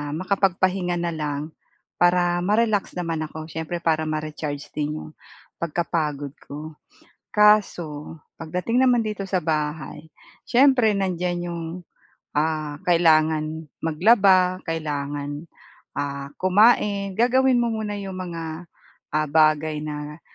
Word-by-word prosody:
makapagpahinga 185 0 +1
na 170 0 -1
lang 150 -2 -3 0.6
para 175 0 +3
ma-relax 210 +2 +1
naman 165 -3 -2
ako, 155 +1 -8
siyempre 160 +2 -4
para 160 -1 +1
ma-recharge 155 -2 -4
din 150 0 -2
'yong 155 - -9 0.5
pagkapagod 150 -4 -2
ko. 155 +2 -8 0.6
Kaso 175 -8 +2 0.2
pagdating 180 +10 -1
naman 245 -2 +4
dito 210 -2 -3
sa 185 - +2
bahay, 155 -1 -3 0.4
siyempre 250 -3 +4
nandiyan 180 -2 -1
'yong, 170 -1 -4 0.7
ah, 155 -1 -1
kailangan 160 -2 +3 0.2
maglaba, 185 +1 +4
kailangan 145 -1 -3 0.5
ah, 140 -1 -3
kumain, 200 0 +3
gagawin 255 +1 +4
mo 240 - +2
muna 215 -2 -3
yung 195 -1 -6
mga, 165 -2 -6 0.5
ah, 155 0 0
bagay 155 0 +2
na 150 +1 -6
165 Hz, 110 wpm, -23 LUFS, 155-190 Hz, 0.7 s, naman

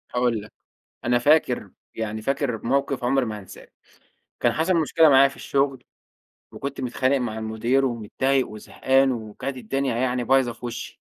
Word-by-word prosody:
هاقول 120 -3 +1
لك، 105 - -13 0.5
أنا 120 0 +3
فاكر، 125 -7 +2 0.3
يعني 110 -1 -4
فاكر 135 -2 -1
موقِف 135 0 0
عُمري 130 +1 +2
ما 105 -2 -5
هانساه، 95 - -13 0.7
كان - - +3
حصَل 165 +4 +1
مشكلة 160 -1 +4
معايا 135 0 +7
في 140 - -10
الشغل 135 -2 -1 0.7
وكنت 140 0 -5
متخانق 130 +2 +1
مع 120 -4 -2
المدير 115 +5 0
ومتضايق 130 +3 0
وزهقان 130 +5 +1
وكانت 115 +4 -5
الدنيا 130 +1 -2
يعني 125 0 0
بايظة 130 -1 +3
في 120 +1 -8
وشّي، 120 - -7
130 Hz, 150 wpm, -24 LUFS, 115-135 Hz, 0.7 s, معايا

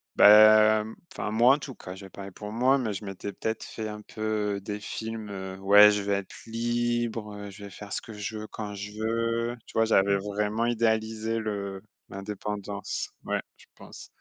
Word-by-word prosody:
bah, 110 +1 +8
mmh, 110 +1 -9 0.2
enfin, 105 - -3
moi 120 +5 +6
en - - -6
tout 135 -2 -8
cas, 90 - -9
je 95 - -10
vais - - -11
parler 100 0 -9
pour 105 +2 -8
moi, 130 +4 +3
mais 110 -4 -1
je 100 +2 -6
m'étais 95 +1 -5
peut-être 110 +2 -3
fait 110 -1 -6
un 105 0 -7
peu 105 -2 -2
des 105 +1 -5
films, 110 0 -5
heu: 95 -1 -6
«Ouais, 105 +2 +8
je 105 0 0
vais 100 0 -1
être 100 -1 -3
libre, 115 -3 -2
je 100 +1 -10
vais - - -8
faire 105 +1 -9
ce - - -2
que 110 - -10
je 105 +1 -5
veux 110 - -7
quand 105 -1 -6
je 100 +1 -7
veux». 115 +1 0
Tu - - -14
vois? 115 0 +3
J'avais 100 -2 +3
vraiment 105 +3 -1
idéalisé 110 -1 0
le 100 -3 -4 0.3
l'indépendance, 100 0 -5 0.2
ouais, - - -1 0.2
je - - -19
pense. - - -12
105 Hz, 200 wpm, -27 LUFS, 100-110 Hz, 0.3 s, bah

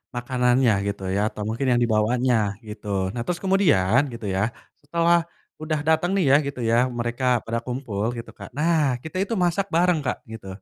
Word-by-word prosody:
makanannya 125 0 +2 0.2
gitu 100 -1 -4
ya - - +1
atau 105 - -9
mungkin 115 +5 -2
yang 120 0 +3
dibawanya 120 +3 +1 0.3
gitu, 105 0 -9 0.3
nah 120 - -3
terus 175 -1 -1
kemudian 145 - +3
gitu 115 -2 -7
ya, 95 - +1 0.4
setelah, 170 +3 +2 0.4
udah 155 -1 -1
datang 160 +2 +3
nih 195 - +2
ya - - +7
gitu 140 -2 -6
ya 115 - +3 0.2
mereka 120 +2 -3 0.2
pada 115 +1 -1
kumpul 120 -5 -3
gitu 115 - -8
Kak - - -9
nah 150 -4 +2
kita 160 - -9
itu 200 - -4
masak 180 +3 +1
bareng 175 -1 +3
Kak - - -1
gitu. 110 -3 -9
130 Hz, 180 wpm, -24 LUFS, 115-165 Hz, 0.4 s, ya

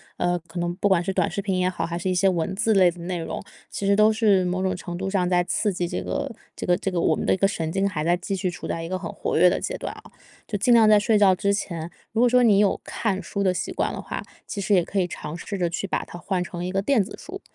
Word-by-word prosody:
呃， 175 0 0
可 165 - -10
能 175 0 -1
不 200 +2 +1
管 185 -3 +3
是 195 - -1
短 - - +1
视 200 - -3
频 190 -2 -1
也 180 0 +2
好， 165 -3 -3
还 170 0 -4
是 185 - -2
一 185 - 0
些 190 +2 +4
文 180 +1 -1
字 220 +2 +2
类 185 -2 +6
的 175 0 -8
内 175 +1 -3
容， 165 +3 -5 0.3
其 200 - -4
实 200 - +4
都 215 +1 +5
是 210 -4 +3
某 185 +1 -1
种 190 0 +1
程 175 -1 -6
度 190 +1 -3
上 190 -2 +1
在 175 -1 +3
刺 205 +3 0
激 175 0 -1
这 175 - -3
个 - - -3 0.2
这 - - -5
个 175 0 +3
这 195 - -2
个 180 -3 -1
我 - - +3
们 - - -2
的 - - +3
一 - - 0
个 195 - +2
神 165 -5 -1
经 195 +1 +1
还 155 -4 -3
再 175 - +3
继 180 +3 -5
续 185 -1 -1
处 170 - -8
在 165 - -3
一 165 - -5
个 185 - -2
很 175 -3 -6
活 - - -3
跃 180 +2 +7
的 - - 0
阶 - - -3
段 - - -5
哦。 - - -15 0.4
就 205 - -2
尽 240 +4 +4
量 225 -2 +6
在 215 - +7
睡 210 +1 +3
觉 195 -2 +5
之 200 +2 +1
前， 170 -4 -4 0.2
如 225 - +2
果 245 - +5
说 250 +1 +5
你 215 -5 +5
有 205 -2 +2
看 200 -4 -2
书 200 +2 -3
的 185 - +3
习 - - -3
惯 - - 0
的 - - -5
话， - - -5 0.2
其 200 - -4
实 205 - +1
也 180 -3 +4
可 200 - -5
以 180 - +1
尝 160 -2 -6
试 200 - -5
着 175 -2 0
去 175 - -3
把 190 - -2
它 175 - -10
换 185 0 -2
成 175 0 -5
一 180 - -3
个 195 +1 0
电 230 -1 +3
子 195 - -10
书， 385 +2 -9
185 Hz, 340 characters per minute, -24 LUFS, 175-200 Hz, 0.4 s, 跃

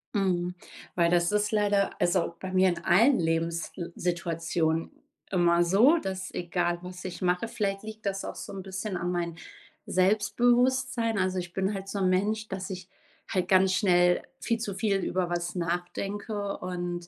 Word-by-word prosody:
Mhm. 180 -3 +1 0.4
Weil 170 -1 +3
das 175 +1 +3
ist 210 0 +1
leider, 205 -2 +1
also, 175 -1 +1
bei 190 - -5
mir 185 0 +5
in 170 -1 -3
allen 240 +8 +5
Lebenssituationen 165 0 -1 0.4
immer 175 -2 +4
so, 215 - +5
dass 190 - -4
egal 175 0 -1
was 180 0 -8
ich 185 0 -5
mache 180 +5 +1
vielleicht 195 -3 -2
liegt 220 0 -9
das 195 -1 -1
auch - - -5
so - - -7
'n 195 - -5
bisschen 190 +1 -4
an 175 +1 -2
mein 170 -2 -2 0.5
Selbstbewusstsein 235 +4 +2
also, 185 -1 0
ich 175 -1 -7
bin 190 +2 0
halt 195 -1 -5
so 200 - -4
'n 185 -1 +2
Mensch, 210 +4 0
dass 190 -2 -5
ich 185 -1 -7 0.4
halt 185 -2 -1
ganz 190 0 +4
schnell 180 -2 +4 0.2
viel 230 -1 -1
zu 205 -4 -4
viel 205 -2 +1
über 185 -2 -1
was 175 +1 -2
nachdenke 195 +4 -3
und 175 -1 -4
185 Hz, 165 wpm, -28 LUFS, 175-205 Hz, 0.5 s, mir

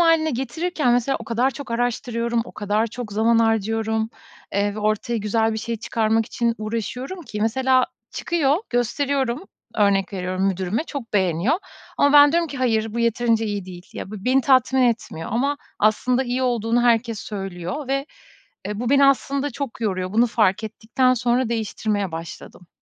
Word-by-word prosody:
hâline 325 -2 +4
getirirken 270 +2 -1
mesela 245 +3 +1
o - - -7
kadar 240 +3 +1
çok 270 0 -9
araştırıyorum, 235 0 -1
o - - -12
kadar 210 +2 0
çok 230 -2 -7
zaman 225 +2 +3
harcıyorum, 225 0 +1 0.5
ııı, 205 0 +1
ve - - -6
ortaya 215 +2 0
güzel 220 +1 +1
bir 220 - -2
şey 230 +1 -3
çıkarmak 225 0 0
için 235 -2 0
uğraşıyorum 240 - -4
ki 210 -7 -6
mesela 255 +3 +3 0.2
çıkıyor, 305 -4 +1
gösteriyorum. 265 - 0 0.3
Örnek 200 -1 +2
veriyorum 185 +1 -1
müdürüme, 190 - -1
çok 275 -9 -7
beğeniyor 190 - +2 0.4
ama 285 0 +4
ben 290 0 +8
diyorum 335 -1 +1
ki, 280 - -7
"hayır 225 -3 0
bu - - -2
yeterince 230 -1 +2
iyi 205 -2 -3
değil." 180 -1 -10
Ya 190 - -7
be - - -5
beni 255 +6 +2
tatmin 260 0 +3
etmiyor 215 -9 -1
ama 280 +5 +1 0.2
aslında 245 +5 +2
iyi 250 +1 -1
olduğunu 240 -1 +1
herkes 230 -2 +2
söylüyor 195 - -5
ve, 275 +1 -1 0.6
e, 210 +1 -4
bu 245 0 -1
beni 280 0 +5
aslında 275 +1 +1
çok 270 -2 -6
yoruyor. 185 -2 -2
Bunu 235 +2 +4
fark 215 -2 +2
ettikten 230 +4 +1
sonra 240 0 +1
değiştirmeye 210 -4 -2
başladım. 165 +2 -9
230 Hz, 165 wpm, -22 LUFS, 215-260 Hz, 0.6 s, ben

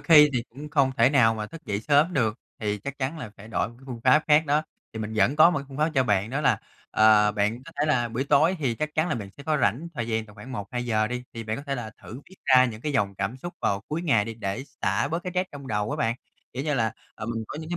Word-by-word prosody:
khi 150 -3 +7
thì 120 -2 0
cũng 145 +5 -9
không 140 -3 +3
thể 130 - +5
nào 115 -6 +4
mà 105 -1 -4
thức 165 +7 -12
dậy 100 0 -2
sớm 150 +6 +3
được, 115 -5 0 0.2
thì 105 -1 -2
chắc 140 +7 -7
chắn 140 +5 -2
là 120 -8 -7
phải 105 +2 -12
đổi 115 - -1
một 120 - -14
cái - - -20
phương 120 -3 -6
pháp 150 +4 +6
khác 150 +1 +5
đó, 150 +2 +2 0.3
thì 110 - -6
mình 110 0 -4
vẫn 130 +6 +3
có 155 +2 +8
một 160 - 0
cái 140 - -7
phương 135 - -9
pháp 155 +2 +2
cho 130 -2 +3
bạn 105 0 +1
đó 135 - -1
là, 150 - +3 0.3
ờ, 105 -1 +5
bạn 105 +4 0
có - - -12
thể 150 - +2
là 120 -5 +2
buổi 120 +4 -2
tối 160 +7 +4
thì 130 -6 0
chắc 155 +3 -4
chắn 155 +3 +1
là - - 0
bạn 100 -4 -6
sẽ 140 - -10
có 155 0 0
rảnh 120 - +1
thời 120 -3 -3
gian 110 -1 -1
tầm 105 - -16
khoảng 115 +5 -10
1-2 120 +2 -4
giờ 110 -2 +2
đi, 125 +2 -4
thì 115 -1 -6
bạn 110 +1 -2
có 140 - -7
thể 140 - -1
là 120 -4 -5
thử 120 +5 -9
viết 190 - -15
ra 130 -1 +6
những 115 -3 -4
cái 150 +1 -2
dòng 100 -7 +1
cảm 100 +6 -3
xúc 175 +6 -7
vào 100 0 0
cuối 160 +3 -2
ngày 115 -12 +3
đi 115 - -6
để 110 +3 -4 0.2
xả - - +1
bớt 165 +4 -2
cái 180 - -5
stress 185 +1 0
trong 140 -2 -9
đầu 105 -2 -1
á - - -2
bạn. 115 +1 0 0.4
Kiểu 130 +3 -3
như 150 -2 0
là, 115 -4 +1 0.2
ờ, 110 - -7
mình 115 -1 -3
có 150 - -6
những 160 - -8
cái 175 - -1
125 Hz, 305 wpm, -26 LUFS, 110-150 Hz, 0.4 s, có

